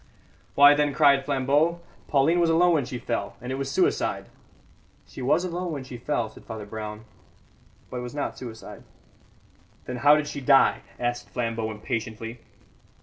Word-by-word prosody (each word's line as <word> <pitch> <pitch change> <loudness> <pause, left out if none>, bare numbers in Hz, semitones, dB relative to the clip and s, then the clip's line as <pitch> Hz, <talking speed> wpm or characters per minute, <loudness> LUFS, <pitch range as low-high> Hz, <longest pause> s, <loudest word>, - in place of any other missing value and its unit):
"Why, 145 +1 +8
then," 145 -1 +1
cried 140 -2 +5
Flambeau, 145 +5 +1 0.3
"Pauline 155 +5 +3
was 170 -1 +3
alone 175 +2 +4
when 145 -5 +1
she 125 - -5
fell, - - -3
and 125 +2 -6
it 135 - -3
was 135 0 -3
suicide!" 140 - 0 0.8
"She - - -10
was 140 +7 +2
alone 180 0 -3
when 140 -4 -5
she 130 -1 -9
fell," 120 -2 -1
said 110 - -15
Father 110 -2 -7
Brown, 105 +1 -7 0.9
"but 125 - -4
it - - -3
was 125 +3 -7
not 145 - -3
suicide." 115 -3 -9 1.0
"Then 125 - -5
how 145 +4 +6
did 150 0 0
she 140 - -5
die?" 135 +1 +4 0.2
asked 120 0 -2
Flambeau 115 -2 -2
impatiently. 115 +2 -5
135 Hz, 165 wpm, -25 LUFS, 120-145 Hz, 1.0 s, Why